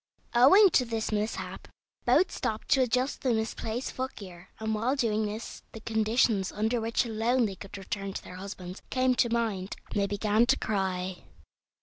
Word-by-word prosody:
Owing 355 Hz, -, +7 dB
to 255 Hz, -, +4 dB
this 225 Hz, -2 st, -3 dB
mishap 215 Hz, +1 st, -3 dB, 0.4 s
both 370 Hz, -, +4 dB
stopped 220 Hz, 0 st, -3 dB
to 275 Hz, -2 st, +5 dB
adjust 255 Hz, +2 st, 0 dB
the 250 Hz, -3 st, +2 dB
misplaced 220 Hz, +2 st, -3 dB
footgear, 195 Hz, -9 st, -7 dB
and 220 Hz, 0 st, -1 dB
while 230 Hz, +6 st, +1 dB
doing 220 Hz, -5 st, +1 dB
this 215 Hz, +2 st, -6 dB
the 225 Hz, -, -7 dB
conditions 220 Hz, -2 st, +1 dB
under 220 Hz, +3 st, 0 dB
which 230 Hz, +3 st, +1 dB
alone 230 Hz, +2 st, +1 dB
they 200 Hz, -, -3 dB
could 195 Hz, +2 st, -9 dB
return 195 Hz, 0 st, -4 dB
to -, -, -6 dB
their 180 Hz, -, -10 dB
husbands 185 Hz, -1 st, -8 dB
came 255 Hz, 0 st, +2 dB
to 240 Hz, -1 st, +2 dB
mind, 220 Hz, -5 st, -1 dB, 0.2 s
and 205 Hz, -, 0 dB
they 200 Hz, -, +1 dB
began 210 Hz, +3 st, +2 dB
to -, -, +4 dB
cry. 190 Hz, -3 st, -2 dB
220 Hz, 170 wpm, -29 LUFS, 200-240 Hz, 0.4 s, Owing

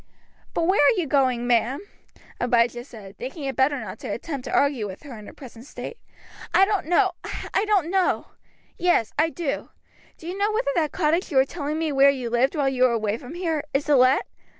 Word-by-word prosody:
"But 335 Hz, -, +1 dB
where 375 Hz, +1 st, +3 dB
are 380 Hz, +7 st, +4 dB
you 345 Hz, -, 0 dB
going, 260 Hz, -4 st, +1 dB
ma'am?" 245 Hz, +2 st, +2 dB, 0.6 s
Abijah 240 Hz, 0 st, +1 dB
said, 210 Hz, -6 st, -13 dB
thinking 270 Hz, +5 st, -6 dB
it 270 Hz, -1 st, -3 dB
better 275 Hz, +1 st, +2 dB
not 210 Hz, -5 st, -7 dB
to -, -, -7 dB
attempt 265 Hz, +5 st, -5 dB
to -, -, -5 dB
argue 280 Hz, -7 st, +1 dB
with 190 Hz, -1 st, -10 dB
her 275 Hz, -5 st, -9 dB
in 215 Hz, -1 st, -11 dB
her -, -, -11 dB
present 245 Hz, -2 st, -12 dB
state. 470 Hz, -, -8 dB, 0.6 s
"I 385 Hz, +2 st, +7 dB
don't 395 Hz, -5 st, -1 dB
know, 375 Hz, +3 st, +3 dB, 0.4 s
I 400 Hz, -, +2 dB
don't 390 Hz, -6 st, +1 dB
know. 380 Hz, -1 st, +1 dB, 0.5 s
Yes, 350 Hz, -11 st, +2 dB
I 320 Hz, +1 st, +3 dB
do. 325 Hz, -4 st, -4 dB, 0.5 s
Do -, -, -14 dB
you 360 Hz, -, -4 dB
know 405 Hz, +2 st, +1 dB
whether 430 Hz, -10 st, 0 dB
that 310 Hz, -4 st, 0 dB
cottage 335 Hz, +2 st, 0 dB
you 285 Hz, -, -1 dB
were 265 Hz, -, +6 dB
telling 300 Hz, 0 st, -4 dB
me 320 Hz, -1 st, -1 dB
about 280 Hz, -, -3 dB
where 275 Hz, +1 st, +7 dB
you 255 Hz, -4 st, -2 dB
lived 255 Hz, +6 st, +2 dB
while 285 Hz, -3 st, +1 dB
you 260 Hz, -2 st, -1 dB
were 255 Hz, -1 st, +5 dB
away 215 Hz, -2 st, 0 dB
from 265 Hz, +7 st, -10 dB
here, 330 Hz, -4 st, -1 dB
is 280 Hz, -, +1 dB
to 295 Hz, -, +3 dB
let? 255 Hz, +1 st, +4 dB
280 Hz, 220 wpm, -24 LUFS, 245-335 Hz, 0.6 s, I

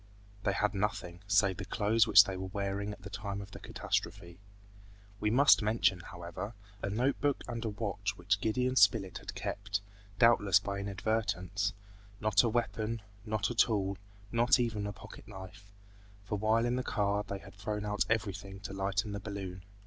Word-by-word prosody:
They 100 Hz, -, +2 dB
had 105 Hz, +1 st, +1 dB
nothing, 95 Hz, -4 st, -2 dB
save 100 Hz, -3 st, +3 dB
the 100 Hz, -, -5 dB
clothes 110 Hz, +2 st, +2 dB
which 100 Hz, -1 st, +9 dB
they 95 Hz, -2 st, -4 dB
were 95 Hz, 0 st, -4 dB
wearing 100 Hz, +1 st, -2 dB
at 100 Hz, -2 st, -10 dB
the 100 Hz, -, -7 dB
time 100 Hz, -2 st, -4 dB
of 100 Hz, 0 st, -9 dB
the -, -, -9 dB
catastrophe. 85 Hz, -1 st, -3 dB, 0.8 s
We 105 Hz, -, +1 dB
must 135 Hz, +4 st, +6 dB
mention, 105 Hz, -3 st, +2 dB
however, 85 Hz, +5 st, -7 dB, 0.3 s
a -, -, -2 dB
note 125 Hz, +7 st, 0 dB
book 145 Hz, -2 st, +1 dB
and 120 Hz, -1 st, -4 dB
a 115 Hz, -, -1 dB
watch 105 Hz, -1 st, -3 dB
which 95 Hz, +3 st, 0 dB
Gideon 125 Hz, +4 st, +1 dB
Spilett 100 Hz, -8 st, +4 dB
had -, -, -8 dB
kept, 100 Hz, 0 st, -3 dB, 0.4 s
doubtless 115 Hz, -6 st, +5 dB
by 100 Hz, -1 st, -4 dB
inadvertence, 100 Hz, 0 st, -1 dB, 0.5 s
not 110 Hz, 0 st, +4 dB
a 120 Hz, -, +1 dB
weapon, 110 Hz, -1 st, -1 dB, 0.2 s
not 110 Hz, +1 st, 0 dB
a -, -, -1 dB
tool, 100 Hz, -4 st, +2 dB, 0.4 s
not 120 Hz, +3 st, +4 dB
even 110 Hz, -4 st, -1 dB
a -, -, -3 dB
pocket -, -, -12 dB
knife; 95 Hz, +1 st, -11 dB, 0.5 s
for 105 Hz, -, -2 dB
while 110 Hz, +3 st, +2 dB
in 120 Hz, +1 st, +1 dB
the 130 Hz, -, -1 dB
car 100 Hz, -2 st, 0 dB
they 100 Hz, -1 st, -5 dB
had 95 Hz, -, -13 dB
thrown 105 Hz, +1 st, -4 dB
out 105 Hz, 0 st, +1 dB
everything 100 Hz, -3 st, -2 dB
to 100 Hz, -1 st, -6 dB
lighten 100 Hz, +2 st, -1 dB
the 100 Hz, -, -3 dB
balloon. 95 Hz, -3 st, -6 dB
105 Hz, 180 wpm, -32 LUFS, 100-110 Hz, 0.8 s, which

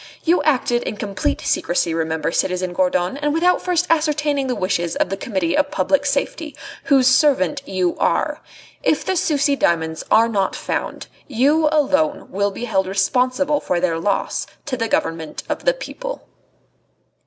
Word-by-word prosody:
You 345 Hz, +2 st, +3 dB
acted 255 Hz, -5 st, +1 dB
in 210 Hz, -, -5 dB
complete 200 Hz, -2 st, -2 dB
secrecy, 175 Hz, -1 st, 0 dB
remember, 160 Hz, -1 st, -1 dB
citizen 180 Hz, 0 st, -1 dB
Gourdon, 180 Hz, +4 st, 0 dB
and 295 Hz, +1 st, -1 dB
without 355 Hz, +2 st, +3 dB
first 355 Hz, -1 st, +1 dB
ascertaining 300 Hz, -3 st, +1 dB
the 250 Hz, -, -1 dB
wishes 175 Hz, -2 st, -1 dB
of -, -, 0 dB
the 195 Hz, -, -2 dB
Committee 190 Hz, -5 st, -1 dB
of -, -, +2 dB
Public 285 Hz, +9 st, +1 dB
Safety, 290 Hz, +2 st, -2 dB, 0.3 s
whose 270 Hz, -4 st, +4 dB
servant 275 Hz, +1 st, +3 dB
you 185 Hz, -2 st, 0 dB
are. -, -, 0 dB, 0.4 s
If -, -, +1 dB
the 380 Hz, -, 0 dB
Sucy 290 Hz, -4 st, +2 dB
diamonds 160 Hz, -8 st, 0 dB
are 225 Hz, +1 st, +5 dB
not 200 Hz, -4 st, 0 dB
found, -, -, -4 dB, 0.2 s
you 290 Hz, +5 st, +3 dB
alone 295 Hz, 0 st, +1 dB
will 200 Hz, +1 st, 0 dB
be 200 Hz, +5 st, -6 dB
held 190 Hz, -5 st, 0 dB
responsible 255 Hz, +9 st, +1 dB
for 180 Hz, -, -1 dB
their 170 Hz, -2 st, 0 dB
loss 200 Hz, +4 st, -1 dB, 0.2 s
to 275 Hz, -, -2 dB
the 230 Hz, -2 st, -1 dB
Government 165 Hz, -6 st, -2 dB
of -, -, -4 dB
the -, -, +4 dB
People." -, -, -7 dB
250 Hz, 160 wpm, -20 LUFS, 185-295 Hz, 0.4 s, are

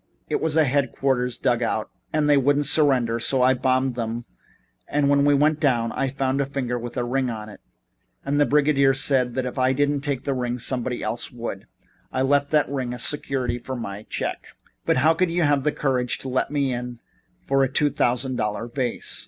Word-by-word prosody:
It -, -, -1 dB
was 160 Hz, -1 st, 0 dB
a 160 Hz, -, +6 dB
headquarters 130 Hz, -2 st, 0 dB
dug 125 Hz, -2 st, 0 dB
out 110 Hz, -2 st, -2 dB, 0.2 s
and 155 Hz, -1 st, +1 dB
they 145 Hz, -, +5 dB
wouldn't 145 Hz, +1 st, +2 dB
surrender, 130 Hz, -6 st, +4 dB
so 130 Hz, +2 st, +2 dB
I 130 Hz, +1 st, +5 dB
bombed 130 Hz, 0 st, +1 dB
them 115 Hz, 0 st, -4 dB, 0.6 s
and 145 Hz, -1 st, +1 dB
then 140 Hz, 0 st, +3 dB
we 145 Hz, 0 st, +4 dB
went 150 Hz, +2 st, +2 dB
down. 120 Hz, -6 st, +1 dB
I 135 Hz, -, -1 dB
found 135 Hz, 0 st, -1 dB
a -, -, 0 dB
finger 125 Hz, -3 st, -3 dB
with 120 Hz, +2 st, -7 dB
a 125 Hz, -, 0 dB
ring 130 Hz, +1 st, -1 dB
on 110 Hz, -2 st, -6 dB
it 105 Hz, -, -13 dB, 0.6 s
and 145 Hz, +1 st, 0 dB
the 145 Hz, -, +4 dB
brigadier 140 Hz, -2 st, +3 dB
said 130 Hz, -2 st, +2 dB
if 130 Hz, 0 st, -2 dB
I 130 Hz, +1 st, +3 dB
didn't 145 Hz, +1 st, 0 dB
take 140 Hz, -3 st, -2 dB
the 140 Hz, -, -1 dB
ring 125 Hz, -1 st, -2 dB
somebody 125 Hz, 0 st, -3 dB
else 120 Hz, -, -2 dB
would. 115 Hz, -5 st, -6 dB, 0.4 s
I 130 Hz, -, 0 dB
left 140 Hz, +1 st, +2 dB
that 150 Hz, -1 st, +2 dB
ring 130 Hz, -3 st, -3 dB
as 125 Hz, -, 0 dB
security 130 Hz, -4 st, -1 dB
for 130 Hz, +2 st, -6 dB
my 105 Hz, -4 st, -6 dB
check." -, -, -4 dB, 0.4 s
"But -, -, +3 dB
how 155 Hz, +5 st, +4 dB
could 180 Hz, +2 st, +1 dB
you 170 Hz, +1 st, 0 dB
have 145 Hz, -2 st, +2 dB
the 150 Hz, -, +1 dB
courage 130 Hz, -4 st, -1 dB
to 135 Hz, -, -5 dB
let 130 Hz, 0 st, 0 dB
me 140 Hz, -3 st, 0 dB
in 120 Hz, -1 st, -6 dB, 0.5 s
for 135 Hz, 0 st, +2 dB
a 135 Hz, -, 0 dB
two 145 Hz, +2 st, +2 dB
thousand 125 Hz, 0 st, 0 dB
dollar 105 Hz, +2 st, -2 dB
vase? 125 Hz, 0 st, -2 dB
130 Hz, 210 wpm, -23 LUFS, 125-140 Hz, 0.6 s, a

